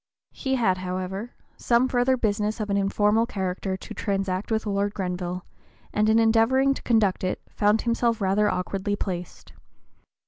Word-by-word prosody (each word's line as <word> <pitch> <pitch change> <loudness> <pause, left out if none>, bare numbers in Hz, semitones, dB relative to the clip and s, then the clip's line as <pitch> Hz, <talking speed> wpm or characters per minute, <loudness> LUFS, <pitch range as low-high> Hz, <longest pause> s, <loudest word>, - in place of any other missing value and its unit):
He 265 -1 -2
had, 190 -7 +1
however, 185 +5 -4 0.2
some 240 +2 +2
further 255 +1 +2
business 210 -1 -1
of 210 -1 -2
an - - +2
informal 210 +3 +2
character 190 -1 -3
to - - -9
transact 195 -2 -2
with 220 -1 0
Lord 200 0 -1
Grenville, 180 -1 -3
(p. - - -34 0.5
022) - - -4
and 215 +1 +4
in 220 - +4
endeavoring 230 +5 +4
to - - -8
conduct 215 -6 +2
it 185 - -1
found 210 +2 +2
himself 235 -1 +1
rather 205 +1 +2
awkwardly 195 +2 -2
placed. 180 -4 -6
205 Hz, 165 wpm, -25 LUFS, 190-225 Hz, 0.5 s, and